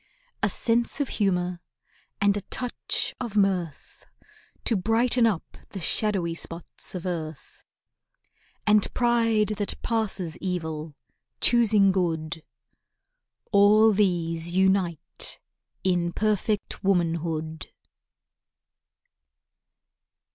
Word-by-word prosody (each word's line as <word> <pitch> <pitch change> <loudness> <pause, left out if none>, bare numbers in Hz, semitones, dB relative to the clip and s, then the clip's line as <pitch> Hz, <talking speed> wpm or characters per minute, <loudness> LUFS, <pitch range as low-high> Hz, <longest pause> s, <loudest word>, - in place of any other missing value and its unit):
A - - +2
sense 235 +3 +1
of 285 - -1
humour, 180 -4 0 0.6
and 200 0 +3
a 205 - -2
touch 250 +5 -1
of 225 -4 -4
mirth, 185 -6 -1 0.6
To 230 - +3
brighten 230 +4 +2
up 195 -7 -3
the 195 - -7
shadowy 185 -1 0
spots 165 +2 -7
of 180 - -5
earth; 160 -4 -6 1.0
And 210 -1 +3
pride 230 -3 +2
that 205 -1 -3
passes 205 -8 -2
evil—choosing 185 - 0
good. 165 -3 -1 1.1
All 210 +2 +6
these 170 -4 +1
unite 190 -3 0 0.4
in 175 -2 +1
perfect 210 -1 -1
womanhood. 165 -4 -1
190 Hz, 85 wpm, -26 LUFS, 170-215 Hz, 1.1 s, All